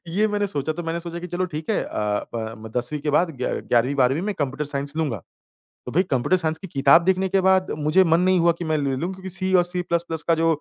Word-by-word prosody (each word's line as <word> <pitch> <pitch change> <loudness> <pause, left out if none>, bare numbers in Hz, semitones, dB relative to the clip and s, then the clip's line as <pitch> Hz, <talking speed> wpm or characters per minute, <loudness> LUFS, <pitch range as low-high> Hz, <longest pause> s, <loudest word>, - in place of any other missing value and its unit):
ये 200 +6 +1
मैंने 205 0 0
सोचा। 155 -4 -2
तो 175 +2 -6
मैंने 165 +1 -3
सोचा 170 0 -6
कि 180 - -6
चलो 180 +1 -2
ठीक 155 -2 -5
है - - +1
अ, - - -8 0.5
ब 110 -1 -4
म 110 0 -9
10वीं 125 +5 -2
के 150 +1 -1
बाद 165 +4 +2
ग - - -1
11वीं 125 +3 +2
12वीं 135 +4 +2
में 210 0 -2
कंप्यूटर 145 0 -2
साइंस 140 +1 -2
लूँगा। 140 - -2 0.6
तो 125 - -6
भई 180 +7 +3
कंप्यूटर 135 +7 +1
साइंस 160 -2 -1
की 190 - -9
किताब 140 +2 +5
देखने 190 0 +2
के 195 0 +2
बाद 190 0 +3
मुझे 155 +5 +3
मन 165 -1 +3
नहीं 185 0 +3
हुआ 170 0 +4
कि 170 - -4
मैं 155 -1 0
ले 140 -2 -1
लूँ 170 +7 -2
क्योंकि 190 0 -8
सी 185 +1 -2
और 180 - +5
सीप्लसप्लस 170 -2 -2
का 165 - +4
जो 165 +1 +1
165 Hz, 260 wpm, -23 LUFS, 145-185 Hz, 0.6 s, किताब